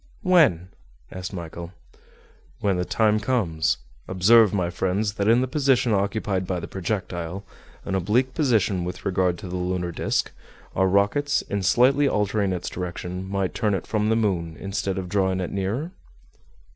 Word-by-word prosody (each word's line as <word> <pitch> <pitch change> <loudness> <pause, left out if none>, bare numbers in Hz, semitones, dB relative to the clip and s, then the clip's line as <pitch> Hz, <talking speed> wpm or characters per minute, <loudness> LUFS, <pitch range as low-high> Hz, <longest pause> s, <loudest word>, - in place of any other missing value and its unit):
"When?" 140 - +4 0.4
asked 90 -1 -6
Michel. 85 -1 -7 0.9
"When 100 -3 +1
the 90 - -1
time 110 +1 +2
comes. 105 -9 0 0.3
Observe, 105 +3 +5
my 90 -4 -1
friends, 95 +3 -1
that 100 -1 -1
in 115 +2 +5
the 130 - 0
position 130 -4 +2
occupied 100 -2 -1
by 90 -2 -1
the - - -6
projectile, 95 -1 -4 0.4
an - - -3
oblique 110 +8 +1
position 110 - +1
with 90 +1 -6
regard 90 -2 +1
to 105 - -8
the 90 +1 -4
lunar 90 -1 -2
disc, - - -1 0.4
our 95 0 +3
rockets, 100 +10 +2
in 100 0 -3
slightly 130 +9 +4
altering 105 -3 0
its 90 -2 -3
direction, 90 +1 -5
might 100 -1 -1
turn 105 -2 0
it 90 - -4
from 110 -1 0
the 110 - +3
moon 90 -7 -1
instead 95 -1 -3
of 95 -1 -4
drawing 95 -1 0
it 90 - -3
nearer?" 105 - -2
95 Hz, 160 wpm, -24 LUFS, 90-110 Hz, 0.9 s, Observe